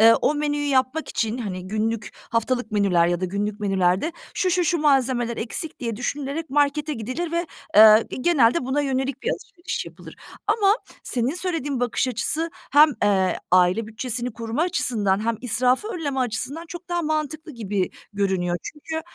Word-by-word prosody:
o 300 - +1
menüyü 290 0 -1
yapmak 265 +3 +1
için, 225 +2 -1
hani, 185 -5 -5
günlük, 215 +2 -2
haftalık 230 0 -2
menüler 185 -5 +3
ya 175 +1 -1
da - - +1
günlük 205 +3 -3
menülerde 195 - +1 0.2
şu, 370 - +1
şu, 355 0 +2
şu 340 +1 +1
malzemeler 260 -5 +2
eksik 270 +7 -3
diye 230 -4 -3
düşünülerek 280 +6 -3
markete 290 +2 +1
gidilir 255 +10 -4
ve, 340 +1 0 0.3
eee, 215 +1 +9 0.2
genelde 265 -4 +3
buna 280 +3 +1
yönelik 270 -1 -2
bir 485 - 0
alışveriş 350 -5 -5
yapılır. - - -12 0.3
Ama 415 -1 +4 0.3
senin 250 +6 -1
söylediğin 320 -8 -2
bakış 245 +1 0
açısı 310 +7 0 0.2
hem, 300 +2 +7
eee, 190 -2 +2
aile 185 +4 +4
bütçesini 240 +1 -3
koruma 230 +5 -3
açısından 215 - 0
hem 230 -1 +1
israfı 250 - +2
önleme 295 -10 -3
açısından 255 +7 -2
çok 350 +1 -9
daha 345 0 0
mantıklı 310 0 -2
gibi 205 -6 -2 0.2
görünüyor. 190 -3 0
Çünkü, 320 +2 -5
255 Hz, 155 wpm, -23 LUFS, 215-305 Hz, 0.3 s, eee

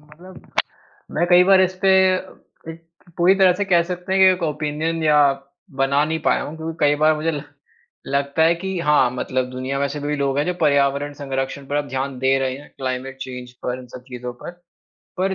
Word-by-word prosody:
मतलब 170 +5 -15 0.7
मैं 170 +3 +1
कई 180 0 +6
बार 190 0 +6
इस 185 0 +2
पे 195 - +4 0.8
एक 165 +1 -16 0.3
पूरी 175 +3 +5
तरह 190 -2 +5
से - - +2
कह 175 -3 +3
सकते 180 +1 -5
हैं 190 - +2
कि - - +8
एक 180 -1 -5
ओपिनियन 155 +1 -2
या 150 -1 +4 0.6
बना 140 +2 +3
नहीं 160 +1 -2
पाया - - +2
हूँ 155 - -7
क्योंकि 160 0 -6
कई 145 0 +4
बार 155 0 +5
मुझे 155 +2 -1
ल 145 -2 -4 0.6
लगता 140 +3 0
है 165 +1 +4
कि 190 +1 -4
हाँ, 150 -5 +3
मतलब 130 0 -2
दुनिया 130 +2 -4
में 140 - 0
ऐसे 145 +1 -6
भी 145 +1 -2
लोग 140 -1 -1
हैं 145 - +2
जो 180 - -1
पर्यावरण 140 -1 +2
संरक्षण 135 -1 -4
पर 145 - -2
अब 145 -1 -2
ध्यान 135 0 -3
दे 135 +1 +2
रहे 130 -1 -2
हैं, 145 - -13
क्लाइमेट 130 0 -4
चेंज 125 -2 -7
पर, 125 0 -2
इन 125 - -12
सब 125 +1 -11
चीज़ों 125 -1 -6
पर, - - -6 0.7
पर 190 +1 0
145 Hz, 210 wpm, -21 LUFS, 135-170 Hz, 0.8 s, कि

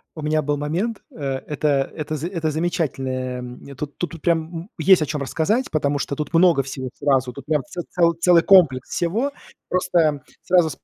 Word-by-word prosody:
У 155 - -7
меня 155 0 +1
был 145 +1 0
момент, 180 +10 -2
э, - - -15 0.3
это, 145 -2 0
это 155 0 -4
за 155 +4 -3
это 165 -4 -2
замечательное, 135 -7 -2
м, 125 +3 -9
тут, 145 +2 -6
тут 170 -3 -5
прям, 170 -1 +3 0.2
м, 170 +5 -7
есть 170 +1 +5
о 150 - 0
чём 150 -2 -3
рассказать, 205 - 0
потому 145 -2 0
что 140 0 -3
тут 150 +3 -5
много 170 -4 +5
всего 130 -1 -6
сразу, 130 -3 +1
тут 125 - -10
прям 150 -1 +1
це 175 - -6
це 180 - -4 0.3
целый 170 -1 +6
комплекс 155 -10 +5
всего. 220 +12 -1 0.4
Просто 175 -5 +2 0.3
сразу 175 -3 +5
с - - -5
155 Hz, 195 wpm, -22 LUFS, 140-175 Hz, 0.4 s, целый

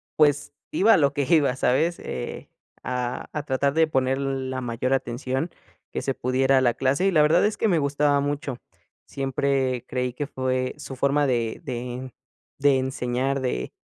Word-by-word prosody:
pues, 145 -1 +3 0.2
iba 225 +3 +5
a - - +6
lo 140 -2 +3
que 145 -2 0
iba, 145 -6 +4
¿sabes? 145 +7 +1
Eh, - - -6 0.3
a 125 -1 -3
a 150 -1 -3
tratar 140 0 0
de 160 0 +4
poner 130 -2 +1
la 130 -1 -2
mayor 125 +2 -1
atención 130 +5 -2 0.4
que - - -3
se 135 - -1
pudiera 130 +2 +2
a - - +1
la 120 -2 +3
clase, 135 +8 +1
y - - +3
la 155 -3 +4
verdad 165 +6 +4
es 210 - 0
que 225 - +1
me 170 -5 +3
gustaba 145 0 +2
mucho. 145 -3 -3 0.5
Siempre 135 -2 -1
creí 125 -1 -2
que 145 +3 -3
fue 130 -1 -1
su 135 - -8
forma 140 +2 +2
de 115 -3 -1
de 125 0 -5 0.5
de 140 -1 +4
enseñar, 130 +1 -1
de 65 - -2
135 Hz, 175 wpm, -25 LUFS, 130-145 Hz, 0.5 s, a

